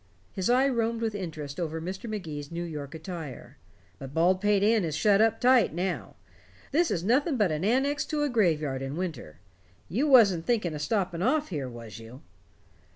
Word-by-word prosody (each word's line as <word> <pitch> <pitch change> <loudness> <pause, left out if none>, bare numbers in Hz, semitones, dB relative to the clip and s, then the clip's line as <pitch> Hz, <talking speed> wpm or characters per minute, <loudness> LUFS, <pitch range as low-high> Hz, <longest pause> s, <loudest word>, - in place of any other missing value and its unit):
His 190 +3 -2
eye 255 +3 +4
roamed 230 -3 0
with 225 -2 -1
interest 155 -7 -6
over 160 -2 -3
Mr. 190 +7 -6
Magee's 155 -9 -6
New 170 +1 -4
York 150 -3 -6
attire. 160 -5 -8 0.4
"But 135 0 -9
Baldpate 190 +4 +3
Inn 220 -1 +3
is 160 -3 -2
shut 200 +6 +4
up 225 0 +3
tight 250 - +4
now. 175 - -3 0.6
This 330 +4 +2
is 170 - -1
nothing 265 - +2
but 205 -7 +2
an 155 +2 -2
annex 270 +7 +1
to 300 -1 -1
a - - +2
graveyard 155 - +1
in 135 +1 -4
winter. 150 - -5 0.5
You 260 +10 0
wasn't 200 - +5
thinking 215 -9 +1
of 150 - -5
stopping 185 -1 -1
off 290 +8 +1
here, 140 -7 -4
was 115 -3 -10
you?" 120 +6 -12
185 Hz, 180 wpm, -28 LUFS, 155-225 Hz, 0.6 s, wasn't